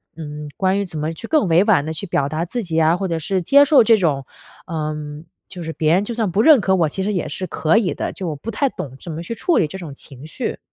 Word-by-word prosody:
嗯， 150 -2 -7
关 190 0 +1
于 200 - -1
怎 165 -4 -6
么 155 +2 -2
去 195 +8 -8
更 305 -8 +2
委 170 +2 +4
婉 205 -9 +3
地 160 - -3
去 160 - -5
表 140 -5 0
达 155 +3 -2
自 235 +7 -4
己 165 -3 -1
啊， 160 +1 +4
或 195 - -2
者 165 -2 -1
是 185 +4 -1
接 280 +11 +6
受 285 -3 +6
这 225 0 +5
种 145 -8 0 0.4
呃， 155 -3 -3 0.5
就 180 -2 -8
是 160 0 -5
别 155 0 +1
人 190 +3 +3
就 235 - -4
算 220 -4 0
不 195 +4 +1
认 300 -5 +7
可 190 -1 +2
我 165 -4 +2
其 190 - -4
实 210 +2 -1
也 180 - -2
是 185 +5 -4
可 160 +5 +1
以 210 -5 +1
的， - - -3
就 185 - -5
我 155 - -4
不 210 +11 -6
太 275 +5 0
懂 135 - -7
怎 170 - -7
么 160 +2 -5
去 200 - -5
处 330 - +1
理 - - +3
这 190 - -8
种 160 -6 -8
情 135 0 -10
绪。 - - -4
175 Hz, 310 characters per minute, -20 LUFS, 155-205 Hz, 0.5 s, 认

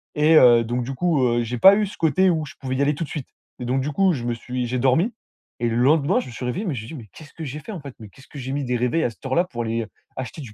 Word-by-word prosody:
et 155 +2 +4
heu, 120 -5 +7
donc 120 +2 -2
du 135 +3 -5
coup, 155 -2 +1
heu, 120 -1 +1
j'ai 120 +2 -4
pas 195 +10 +8
eu 215 - +1
ce 195 - -10
côté 165 +4 +3
où 160 -3 0
je 140 - -12
pouvais 130 -1 -3
y 135 - 0
aller 145 +1 +2
tout 165 +3 -4
de - - -15
suite 150 -5 -6 0.3
et - - -5
donc 130 +2 0
du 145 +3 -2
coup, 190 +5 +3
je 125 -8 -3
me 120 - 0
suis 125 +2 -4
j'ai 125 +1 -2
dormi 135 - +2 0.5
et 120 0 0
le 115 - -1
lendemain, 145 +7 +3
je - - -6
me - - -9
suis 120 +2 -6
réveillé, 175 - -2
mais 165 -8 -2
je 110 - -5
me - - -10
suis 160 - -8
dit: 135 - -8
«Mais 105 - -18
qu'est-ce 155 -2 -14
que 165 - -8
j'ai 145 0 -5
fait, 155 - -9
en 195 - -6
fait? 140 -3 -10
Mais 110 -2 -11
qu'est-ce 130 +6 -18
que - - -12
j'ai 130 0 -5
mis 145 0 -2
des 125 0 -1
réveils 125 +7 0
à - - +1
cette 115 - -16
heure-là 135 +7 +2
pour 120 -9 -5
aller 115 0 -2 0.3
acheter 130 +4 -6
du 120 -6 -10
130 Hz, 350 wpm, -23 LUFS, 120-155 Hz, 0.5 s, pas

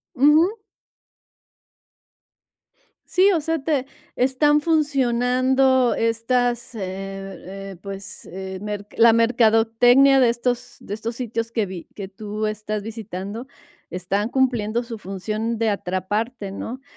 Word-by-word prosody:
Ujú. 305 - +5 2.5
Sí, 380 +2 +4
o 345 - +2
sea, 325 +1 -1
te 280 -4 0 0.3
están 295 +4 +3
funcionando 260 -4 +2
estas, 240 +2 0
eh 220 - -6 0.7
eh, 195 0 -8
pues, 195 0 -8
eh, 190 +1 -7
mer 205 -1 -5
la 230 0 +7
mercadotecnia 230 +3 +5
de 250 -2 +5
estos 240 +1 -2
de 205 - -6
estos 225 +2 -5
sitios 230 -2 -3
que 225 -3 0
vi 180 -2 -8
que 200 -2 -6
tú 210 +2 -4
estás 215 0 -3
visitando, 215 0 -6 0.5
están 195 +4 -1
cumpliendo 240 -4 +1
su 235 -2 -7
función 215 +4 -3
de 225 -1 +2
atraparte, 205 +3 -2
¿no? 240 +6 -6
230 Hz, 115 wpm, -22 LUFS, 210-255 Hz, 2.5 s, la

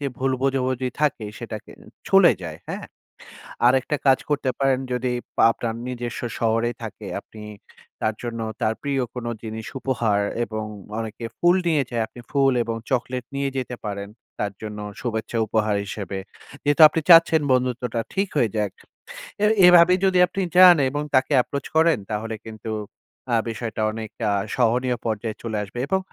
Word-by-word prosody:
এ 140 - +1
ভুল 130 0 +1
বোঝাবুঝি 130 -1 0
থাকে 145 -7 +1
সেটাকে - - -7 0.4
ছলে 195 -3 +7
যায়, 80 -3 -6
হ্যাঁ? - - -5 0.8
আরেকটা 130 +4 +3
কাজ 135 -1 +6
করতে 145 -3 0
পারেন 135 -1 +2
যদি 125 0 -1 0.3
আপনার 115 0 +3
নিজস্ব 120 -1 -4 0.2
শহরেই 115 +1 +1
থাকে, - - -7
আপনি 110 - -13 0.6
তার 110 - 0
জন্য 115 -1 -4 0.2
তার 110 0 +1
প্রিয় 140 -2 0
কোন 125 -1 -5 0.2
জিনিস 110 -1 -6
উপহার 115 -6 +1 0.2
এবং 110 -1 -5 0.3
অনেকে 110 +1 -5
ফুল 175 +1 +4
নিয়ে 155 -4 +3
যায়। 120 -2 0
আপনি 120 - -13
ফুল 135 -1 +3
এবং 115 -1 -3
চকলেট 125 -1 -1
নিয়ে 140 0 0
যেতে 125 -1 -4
পারেন। 100 0 -5 0.3
তার 105 -1 -1
জন্য 105 -1 -6 0.2
শুভেচ্ছা 115 -1 -3
উপহার 105 -1 +1
হিসেবে। 100 -1 -5 0.4
যেহেতু 145 +2 +3
আপনি 160 - -1
চাচ্ছেন 165 -1 +7
বন্ধুত্বটা 125 -2 0
ঠিক 195 +1 0
হয়ে 120 -6 +3
যাক। 105 -2 0 0.7
এ - - +6 0.2
এভাবেই 180 +1 +7
যদি 190 -1 +3
আপনি 195 +2 -3
চান 180 -1 +9
এবং 145 +2 -3
তাকে 130 +3 +3
approach 140 +2 -5
করেন 160 -2 +4
তাহলে 110 +1 -3
কিন্তু 110 0 -7 0.6
আ - - +5
বিষয়টা 115 -1 -4
অনেকটা 110 0 -5 0.3
সহনীয় 125 +1 +1
পর্যায়ে 110 -1 -2
চলে 110 -2 -3
আসবে। 105 +4 -8
এবং 190 +3 +1
120 Hz, 155 wpm, -23 LUFS, 110-140 Hz, 0.8 s, চান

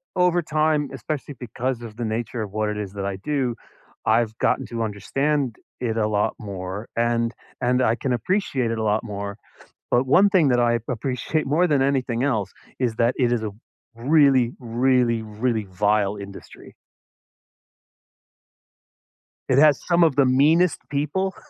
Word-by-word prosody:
over 180 -1 +2
time, 155 -2 +1
especially 145 +3 -5
because 125 +1 -3
of 110 -2 -9
the 120 - -3
nature 110 +1 -3
of 100 - -7
what 110 0 -1
it 105 - -3
is 100 -2 -5
that 100 -1 -4
I 100 -1 -2
do, 125 +2 -2 0.5
I've 110 0 +2
gotten - - 0
to 115 -1 -3
understand 130 +5 -1 0.2
it 115 -2 -2
a 105 -1 +2
lot 105 -1 0
more, 100 +1 -6
and 115 0 +1 0.3
and 125 0 +1
I 115 -2 +3
can 130 0 -2
appreciate 130 - 0
it 115 - -2
a 110 - -2
lot 105 +2 +1
more. 100 -2 -5 0.6
But 125 +2 +2
one 195 +9 +5
thing 180 -7 +4
that 125 -2 +3
I 120 -1 +2
appreciate 125 +6 -2
more 165 +6 +2
than 140 -4 +2
anything 130 -3 0
else 110 -9 0 0.3
is 120 -4 0
that 120 +2 +2
it 120 -2 +2
is 115 -2 0
a 105 - -3 0.4
really, 130 -1 +3
really, 120 -1 +1
really 110 0 -2
vile 105 +1 +1
industry. 100 0 -11 2.8
It 130 - +3
has 150 -1 +5
some 170 -1 +3
of 155 -5 +3
the 140 -2 +4
meanest 155 +7 +3
people, 150 +7 -1
120 Hz, 160 wpm, -23 LUFS, 110-140 Hz, 2.8 s, one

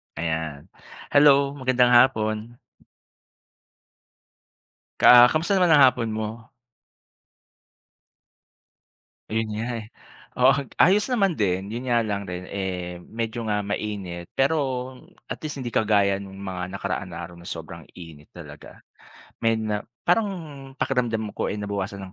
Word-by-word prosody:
Ayan. 80 -1 -4 0.4
Hello, 140 -1 +5
magandang 125 -1 +3
hapon. 115 -2 +3 2.4
Ka 120 0 +9
kamusta 165 +8 +1
naman 180 -2 +4
ang 145 - +7
hapon 125 -3 +3
mo? 110 +1 -5 2.8
Ayun 110 0 -1
nga, 110 - -3 0.2
eh. - - -11 0.5
Oo. 130 +2 +6 0.2
Ayos 200 - +4
naman 200 -7 +2
din, 95 - -1
'yon 125 +2 -5
nga 120 -1 +2
lang 100 -2 -3
rin 90 0 -6
eh, 90 -2 -5
medyo 115 +4 -5
nga 105 -1 -1
mainit, 100 -4 -5
pero 140 +4 +3 0.7
at - - -6
least 150 -2 -5
hindi 125 -3 -5
kagaya 100 -2 +2
nung 95 -1 -10
mga 95 -2 -5
nakaraan 95 0 -4
na 85 - -8
araw 90 - -13
na 85 - -12
sobrang - - -8
init 80 -4 -12
talaga. - - -12 0.6
May 115 0 +2
na 110 -2 -3 0.2
parang 210 +5 +2 0.5
pakiramdam 115 -5 -1
ko - - -3
eh, - - -2
nabawasan 100 -1 -5
ng - - -22
110 Hz, 125 wpm, -24 LUFS, 95-125 Hz, 2.8 s, Ka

